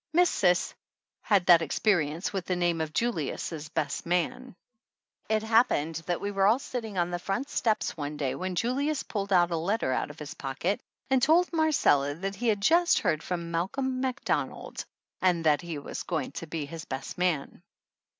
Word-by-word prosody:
Miss 350 +1 +5
Cis 180 -2 +2 0.5
had 200 -4 +2
that 175 -3 +7
experience 165 0 0
with 190 -2 -2
the 185 - +1
name 175 -2 +1
of 155 -1 -3
Julius' 160 - -2
best 150 -3 -2
man. 180 +9 -1 0.7
It 220 0 +1
happened 220 -9 +2
that 175 -1 0
we 205 - -3
were 195 -1 +3
all 220 +4 +5
sitting 230 -6 -5
on 175 0 +1
the 175 - -2
front 220 +10 -3
step 220 -3 +1
one 150 -1 -5
day 140 -3 -1
when 185 0 -4
Julius 275 - 0
pulled 200 -2 -4
a 180 -2 +6
letter 170 - -1
out - - -1
of 145 - -11
his 150 -1 -7
pocket 140 +9 -2 0.3
and 265 -1 +4
told 335 +6 +4
Marcella 260 - +3
that 195 +4 -4
he 235 +4 -3
had 210 -3 +2
just 340 - +4
heard 155 -1 +1
from 170 -1 -4
Malcolm 255 +10 -1
Macdonald, 260 -2 -2 0.4
and 175 -3 +2
that 150 -2 +4
he 170 -3 -5
was 140 - -6
going 165 -3 -3
to 165 - -7
be 155 -2 -3
his 160 +2 -8
best 135 +5 -6
man. 175 -6 -1
180 Hz, 180 wpm, -28 LUFS, 160-225 Hz, 0.7 s, that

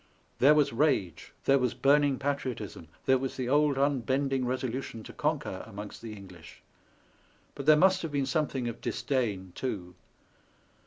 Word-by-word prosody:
There 145 +4 +6
was 150 -5 +3
rage, 115 - 0
there 140 0 +5
was 125 -2 0
burning 140 -1 +3
patriotism, 125 - -4 0.2
there 130 0 +4
was 135 0 -4
the 130 -2 -2
old 145 +1 +3
unbend 135 0 +1
ing 130 -2 0
resolution 130 -2 -3
to - - -10
conquer 150 -10 -2
amongst 105 -1 -8
the 115 -2 -7
English; 95 -5 -13 0.9
but 140 - -7
there 155 - +8
must 185 +3 +4
have 165 - -4
been 140 -2 0
something 135 -3 -1
of 120 0 -6
disdain 105 -9 -2
too. 95 -8 -4
130 Hz, 155 wpm, -29 LUFS, 115-145 Hz, 0.9 s, there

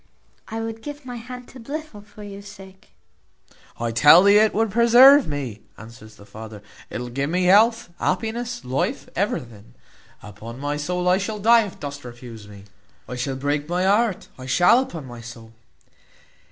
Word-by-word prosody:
I 225 0 -5
would 225 0 -6
give 290 0 -9
my 245 -1 -7
hand 250 +1 -10
to 260 - -13
Blifil 285 -2 -7
for 210 0 -14
your 200 -1 -9
sake." 195 -2 -14 0.9
"I 115 0 -2
tell 150 +9 +7
thee, 200 +1 +6
it 215 0 +3
will 225 +2 +1
preserve 240 +6 +6
me," 130 -8 -5 0.2
answers 110 0 -13
the 100 - -16
father; 110 -1 -11 0.3
"it - - -5
will 125 0 -6
give 140 +4 -3
me 180 +2 0
health, 220 +4 +4
happiness, 225 - -3
life, 130 +2 -2
everything. 120 - -4 0.5
Upon 105 +3 -10
my 145 +1 -2
soul 180 +4 -3
I 180 +1 +3
shall 210 +2 -4
die 225 +1 +4
if 190 - -13
dost 145 0 -7
refuse 120 -3 -11
me; 100 -1 -13 0.4
I 125 - -6
shall 130 +2 -3
break 145 +3 -2
my 180 +1 0
heart, 205 +1 +1
I 130 - -9
shall, 180 - +4
upon 175 - -5
my 120 -2 -10
soul." 115 -1 -12
180 Hz, 175 wpm, -22 LUFS, -, 0.9 s, tell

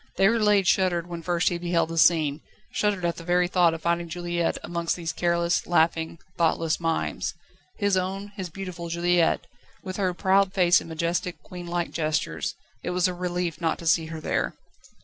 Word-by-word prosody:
Déroulède 210 -1 +4
shuddered 175 -2 +2
when 170 -1 -6
first 175 +1 +1
he 175 - -3
beheld 170 -1 +1
the 165 - -5
scene, 155 -3 +4 0.3
shuddered 200 -4 0
at 170 - -1
the 170 - -8
very 175 +1 +2
thought 175 -2 +3
of 160 - -9
finding 170 0 0
Juliette 175 0 -1
amongst 170 -1 -1
these 165 -2 -4
careless, 170 0 +1
laughing, 165 -1 +2 0.2
thoughtless 165 -1 +2
mimes. 165 -1 -1 0.4
His 200 -2 +2
own, 190 +2 -2
his 190 -3 -5
beautiful 175 -1 -6
Juliette, 170 0 +2 0.4
with 185 0 -5
her 185 -3 0
proud 195 +1 +3
face 175 -3 +5
and - - -10
majestic, 170 +2 -2
queen 175 -1 -9
like 175 0 -2
gestures; 155 -1 -1 0.3
it - - -4
was 180 0 +2
a 180 - -2
relief 175 -2 -3
not 165 -1 +1
to 170 - -10
see 165 0 +3
her 160 0 -6
there. - - -1
175 Hz, 180 wpm, -26 LUFS, 165-180 Hz, 0.4 s, face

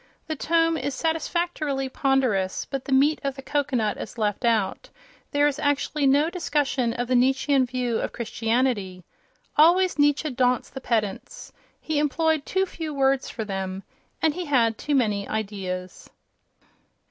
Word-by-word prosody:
The 315 - -3
tome 330 +2 +2
is 285 -3 -3
satisfactorily 320 -3 -1
ponderous, 255 -9 0
but 270 -1 -5
the - - -6
meat 280 +4 +3
of 275 -1 -2
the 270 - -9
cocoanut 265 -7 0
is - - -8
left 210 +1 -1
out: 220 -5 0 0.4
there 290 0 +2
is 295 0 0
actually 285 0 +1
no 285 +3 +4
discussion 285 -8 0
of 245 0 -3
the 255 - 0
Nietzschean 265 +1 +3
view 245 -2 -1
of - - -3
Christianity!... 225 -5 -1 0.5
Always 345 +2 +5
Nietzsche 290 +1 +2
daunts 250 0 +1
the 265 - -7
pedants. 215 -6 -3 0.3
He 310 -2 -1
employed 310 +1 +1
too 380 0 +1
few 320 -5 -6
words 270 0 +2
for 220 - -5
them—and 195 - -4
he 360 +2 -4
had 235 -6 +2
too 290 +6 -2
many 210 -6 +1
ideas. 195 -4 -5
270 Hz, 145 wpm, -25 LUFS, 230-295 Hz, 0.5 s, Always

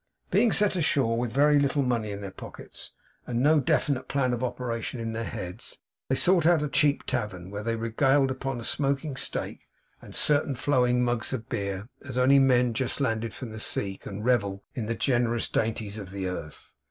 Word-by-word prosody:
Being 235 - +4
set 205 -1 +4
ashore, 140 -8 +2
with 120 0 -1
very 145 +2 +4
little 140 0 +1
money 120 -4 0
in 100 0 -5
their 100 -1 -6
pockets, - - -10 0.4
and 120 -1 -1
no 150 +4 +5
definite 135 -1 0
plan 130 -3 0
of 120 +1 -3
operation 120 -1 -3
in 115 -1 -3
their 115 +1 -3
heads, 100 -3 -6 0.3
they 130 - +2
sought 175 +1 +4
out 170 -3 +4
a - - 0
cheap 145 0 +2
tavern, 100 -7 -3
where 100 0 -4
they 115 +1 -1
regaled 135 +5 +2
upon 130 -1 -3
a - - -7
smoking 140 +2 -1
steak, - - -2 0.3
and - - -10
certain 145 -2 +2
flowing 125 -2 +2
mugs 120 0 -1
of 115 -4 -4
beer, 100 +1 -3 0.2
as 130 -3 -6
only 135 +2 +5
men 125 -3 +4
just 125 +4 -1
landed 115 -4 -1
from 120 +1 -8
the 110 - -7
sea 100 -2 -1
can 100 +2 -8
revel 100 -6 +1
in 120 -7 -4
the 115 - -1
generous 120 -2 +1
dainties 110 -1 -2
of 100 -3 -8
the 95 -1 -4
earth. 80 -5 -7
120 Hz, 195 wpm, -27 LUFS, 110-135 Hz, 0.4 s, no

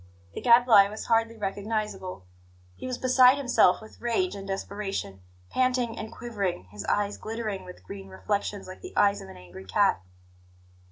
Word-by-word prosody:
The - - -6
Gadfly 235 -4 +7
was 215 +1 -7
hardly 230 0 +1
recognizable; 205 - -3 0.5
he - - -7
was 255 -1 -3
beside 255 +1 +6
himself 245 -9 +4
with 220 - -15
rage 240 +11 0
and 195 0 -8
desperation, 195 - -4 0.3
panting 250 -2 +1
and 220 0 -6
quivering, 205 - -3
his 105 -1 -7
eyes 205 0 0
glittering 215 -4 -4
with 180 - -12
green 95 +1 -9
reflections 145 - -3
like 185 0 -10
the 370 - -10
eyes 200 0 +4
of 95 - -10
an 95 - -11
angry 90 +1 -12
cat. 195 - +2
205 Hz, 160 wpm, -27 LUFS, 185-235 Hz, 0.5 s, Gadfly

